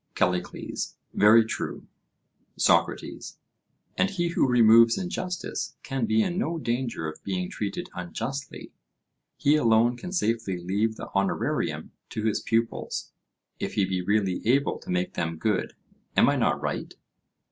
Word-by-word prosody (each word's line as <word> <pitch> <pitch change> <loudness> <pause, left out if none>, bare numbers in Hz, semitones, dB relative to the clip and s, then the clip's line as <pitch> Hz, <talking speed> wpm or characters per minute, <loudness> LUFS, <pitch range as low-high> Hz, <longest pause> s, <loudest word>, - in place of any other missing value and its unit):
CALLICLES: 90 0 -2 0.2
Very 110 +2 +6
true. 110 - -4 0.7
SOCRATES: - - +1 0.6
And 190 - +2
he 175 -4 -1
who 170 - +2
removes 115 -1 +6
injustice 180 0 -4
can 135 -5 -2
be 110 0 +3
in 180 +1 -1
no 170 -5 -1
danger 120 - -2
of 80 - -8
being 90 -2 -3
treated 100 -2 -4
unjustly: 115 +11 -5 0.7
he 145 +2 +3
alone 115 -3 +4
can 180 +9 -7
safely 115 - 0
leave 100 +6 -1
the - - -8
honorarium 100 0 -1 0.2
to 110 - -4
his 110 -1 +1
pupils, 115 0 -1 0.5
if - - -4
he 100 - +3
be 95 -1 -1
really 95 -1 +1
able 135 +5 +2
to - - -14
make 90 0 -1
them 80 -1 -2
good—am 105 +3 -1
I - - +3
not - - +1
right? - - -4
110 Hz, 135 wpm, -26 LUFS, 95-135 Hz, 0.7 s, Very